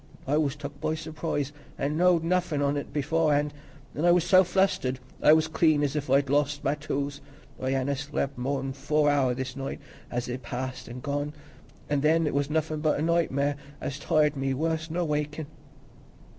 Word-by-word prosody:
I 140 Hz, -, +1 dB
was 150 Hz, -2 st, +1 dB
took 145 Hz, -1 st, -8 dB
by 155 Hz, 0 st, 0 dB
surprise, 155 Hz, -2 st, -3 dB, 0.3 s
an' 145 Hz, +2 st, -1 dB
knowed 175 Hz, 0 st, +4 dB
nothin' 175 Hz, -3 st, +1 dB
on 140 Hz, 0 st, +1 dB
it 145 Hz, -, -4 dB
beforehand, 150 Hz, 0 st, +1 dB, 0.4 s
an' 150 Hz, -, -3 dB
I 175 Hz, -, +5 dB
was 175 Hz, -1 st, +4 dB
so 185 Hz, +2 st, +6 dB
flustered, 180 Hz, -8 st, +1 dB, 0.2 s
I -, -, +7 dB
was 160 Hz, 0 st, +4 dB
clean 155 Hz, -2 st, +3 dB
as 145 Hz, 0 st, 0 dB
if 145 Hz, -2 st, -2 dB
I'd 140 Hz, +1 st, +4 dB
lost 145 Hz, +1 st, +1 dB
my 140 Hz, -, +2 dB
tools. 145 Hz, -1 st, -3 dB, 0.4 s
I 130 Hz, -, -1 dB
hanna 135 Hz, +1 st, 0 dB
slep' 140 Hz, 0 st, -3 dB
more 135 Hz, +2 st, -2 dB
nor 135 Hz, 0 st, -3 dB
four 150 Hz, +2 st, +2 dB
hour 130 Hz, -3 st, +2 dB
this 130 Hz, 0 st, -4 dB
night 135 Hz, 0 st, -4 dB, 0.3 s
as 120 Hz, 0 st, -2 dB
is 125 Hz, +1 st, -3 dB
past 130 Hz, +1 st, -5 dB
an' 125 Hz, +1 st, -7 dB
gone; 145 Hz, +2 st, -2 dB, 0.5 s
an' 145 Hz, -1 st, +1 dB
then 160 Hz, +2 st, +3 dB
it 150 Hz, -, -1 dB
was 140 Hz, 0 st, 0 dB
nothin' 155 Hz, 0 st, 0 dB
but 150 Hz, -1 st, +1 dB
nightmare, 145 Hz, -4 st, +1 dB, 0.2 s
as 140 Hz, +1 st, -4 dB
tired 150 Hz, -1 st, +2 dB
me 135 Hz, -1 st, -1 dB
worse 160 Hz, +2 st, -1 dB
nor 175 Hz, +2 st, -1 dB
wakin'." 150 Hz, 0 st, -2 dB
145 Hz, 190 wpm, -27 LUFS, 135-155 Hz, 0.5 s, I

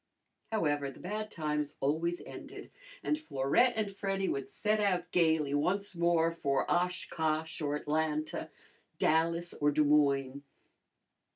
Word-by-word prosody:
However, 145 Hz, -9 st, 0 dB
the 135 Hz, -, -12 dB
bad 215 Hz, +3 st, -4 dB
times 150 Hz, -5 st, -2 dB
always 165 Hz, +5 st, 0 dB
ended, -, -, -10 dB, 0.3 s
and 300 Hz, -, 0 dB
Florette 240 Hz, -, +2 dB
and 215 Hz, -2 st, -1 dB
Freddy 195 Hz, -1 st, -1 dB
would 135 Hz, -1 st, -3 dB
set 215 Hz, 0 st, 0 dB
out 180 Hz, -4 st, 0 dB
gayly 160 Hz, -4 st, +2 dB
once 185 Hz, +7 st, +1 dB
more 170 Hz, -1 st, +3 dB
for 140 Hz, -5 st, 0 dB
Oshkosh 160 Hz, -3 st, -1 dB
or 145 Hz, -1 st, 0 dB
Atlanta, 155 Hz, +1 st, -1 dB, 0.5 s
Dallas 165 Hz, +2 st, +2 dB
or 145 Hz, -, +1 dB
Des 150 Hz, +1 st, +3 dB
Moines. 140 Hz, -2 st, +2 dB
160 Hz, 125 wpm, -32 LUFS, 145-180 Hz, 0.5 s, more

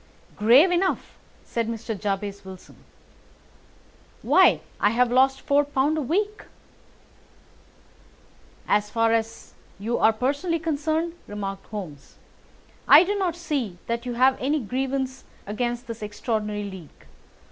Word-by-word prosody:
"Grave 250 Hz, -, +6 dB
enough!" 365 Hz, +2 st, -1 dB, 0.3 s
said 230 Hz, -1 st, -3 dB
Mr. 225 Hz, 0 st, -4 dB
Jabez 200 Hz, 0 st, -3 dB
Wilson. 190 Hz, -1 st, -12 dB, 1.5 s
"Why, -, -, +5 dB, 0.2 s
I 205 Hz, -, +4 dB
have 240 Hz, +2 st, +2 dB
lost 265 Hz, +2 st, +3 dB
four 285 Hz, +1 st, +3 dB
pound 290 Hz, +1 st, 0 dB
a 310 Hz, -, -1 dB
week." 405 Hz, -, -2 dB, 2.2 s
"As 210 Hz, 0 st, +1 dB
far 230 Hz, +1 st, +2 dB
as 225 Hz, 0 st, -3 dB, 0.2 s
you 220 Hz, +5 st, -2 dB
are 220 Hz, -, +5 dB
personally 285 Hz, +9 st, -1 dB
concerned," 320 Hz, +1 st, -1 dB
remarked 195 Hz, -1 st, -6 dB
Holmes, 180 Hz, -10 st, -8 dB, 0.7 s
"I -, -, +9 dB
do 395 Hz, +3 st, -1 dB
not 375 Hz, -5 st, -1 dB
see 280 Hz, -, -3 dB
that 235 Hz, +1 st, -3 dB
you 245 Hz, -, -3 dB
have 260 Hz, +2 st, +3 dB
any 290 Hz, +4 st, +1 dB
grievance 265 Hz, +2 st, -3 dB, 0.2 s
against 240 Hz, +4 st, -3 dB
this 230 Hz, -2 st, -8 dB
extraordinary 210 Hz, 0 st, -3 dB
league. 190 Hz, -6 st, -10 dB
240 Hz, 125 wpm, -24 LUFS, 210-285 Hz, 2.2 s, I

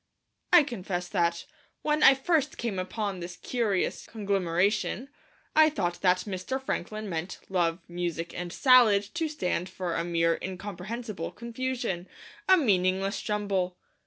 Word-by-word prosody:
I 350 Hz, -3 st, +8 dB
confess 190 Hz, -9 st, -4 dB
that, 170 Hz, -3 st, 0 dB, 0.4 s
when 300 Hz, 0 st, +1 dB
first 300 Hz, +1 st, +1 dB
I -, -, -12 dB
came 220 Hz, -5 st, -3 dB
upon 195 Hz, +1 st, -3 dB
this 175 Hz, 0 st, -6 dB
curious 220 Hz, -7 st, -1 dB
conglomeration, 200 Hz, +4 st, 0 dB, 0.5 s
I 310 Hz, 0 st, +7 dB
thought 175 Hz, -, -2 dB
that 180 Hz, -1 st, +3 dB
Mr. 200 Hz, +6 st, -3 dB
Franklin 215 Hz, -4 st, -4 dB
meant 175 Hz, 0 st, -4 dB
Love, 175 Hz, -2 st, 0 dB
Music, 170 Hz, -1 st, -3 dB
and 175 Hz, 0 st, -5 dB
Salad 240 Hz, -4 st, +6 dB
to 325 Hz, 0 st, -1 dB
stand 180 Hz, -, -2 dB
for 180 Hz, -2 st, -4 dB
a 165 Hz, -, 0 dB
mere 165 Hz, -1 st, +1 dB
incomprehensible 195 Hz, +1 st, -5 dB
confusion, 235 Hz, -6 st, -3 dB, 0.4 s
a 375 Hz, -, +8 dB
meaningless 195 Hz, -, +1 dB
jumble. 195 Hz, -4 st, -1 dB
195 Hz, 130 wpm, -28 LUFS, 175-235 Hz, 0.5 s, I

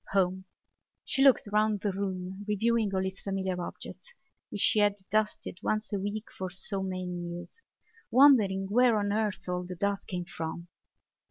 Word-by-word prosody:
Home! 190 Hz, -1 st, +1 dB, 0.6 s
She 270 Hz, -, +1 dB
looked 270 Hz, -2 st, +6 dB
round 210 Hz, -1 st, +2 dB
the 205 Hz, -, 0 dB
room, 190 Hz, 0 st, -4 dB
reviewing 220 Hz, 0 st, +1 dB
all 190 Hz, 0 st, +1 dB
its 190 Hz, 0 st, -5 dB
familiar 190 Hz, -2 st, -2 dB
objects 485 Hz, -, -9 dB, 0.3 s
which 205 Hz, -, -5 dB
she 215 Hz, -, +5 dB
had 205 Hz, -1 st, +4 dB, 0.2 s
dusted 210 Hz, -3 st, -1 dB
once 215 Hz, 0 st, -1 dB
a 200 Hz, -, 0 dB
week 205 Hz, +3 st, -4 dB
for 185 Hz, -1 st, -5 dB
so 195 Hz, +2 st, -5 dB
many 185 Hz, -1 st, -3 dB
years, 175 Hz, -1 st, -5 dB, 0.6 s
wondering 225 Hz, -7 st, +5 dB
where 235 Hz, +2 st, +4 dB
on 205 Hz, -1 st, 0 dB
earth 215 Hz, -3 st, -1 dB
all 180 Hz, 0 st, -2 dB
the 180 Hz, 0 st, -7 dB
dust 200 Hz, +2 st, -1 dB
came 180 Hz, -2 st, -3 dB
from. 170 Hz, +1 st, -6 dB
195 Hz, 165 wpm, -29 LUFS, 185-215 Hz, 0.6 s, looked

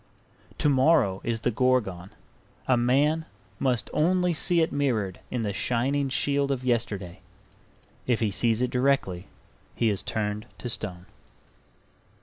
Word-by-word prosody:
To -, -, +1 dB
morrow 130 Hz, -, +3 dB
is 115 Hz, -1 st, -2 dB
the 120 Hz, -, +1 dB
Gorgon; 110 Hz, -7 st, 0 dB, 0.6 s
a 130 Hz, -, +4 dB
man 140 Hz, +7 st, +2 dB, 0.3 s
must 125 Hz, -4 st, +1 dB
only 180 Hz, +3 st, +2 dB
see 170 Hz, +2 st, +1 dB
it 160 Hz, -, +1 dB
mirrored 115 Hz, -10 st, -1 dB
in 120 Hz, -2 st, -2 dB
the 100 Hz, -2 st, -2 dB
shining 135 Hz, +6 st, 0 dB
shield 140 Hz, +2 st, 0 dB
of 135 Hz, -2 st, -1 dB
yesterday. 105 Hz, -7 st, -1 dB, 0.9 s
If 120 Hz, -3 st, +2 dB
he 110 Hz, -3 st, +1 dB
sees 115 Hz, +4 st, +1 dB
it 125 Hz, -, -1 dB
directly 125 Hz, -9 st, +1 dB, 0.5 s
he 115 Hz, -2 st, +2 dB
is 100 Hz, -, -1 dB
turned 105 Hz, +1 st, -3 dB
to 125 Hz, -, -5 dB
stone. 90 Hz, -6 st, -6 dB
125 Hz, 135 wpm, -26 LUFS, 105-140 Hz, 0.9 s, a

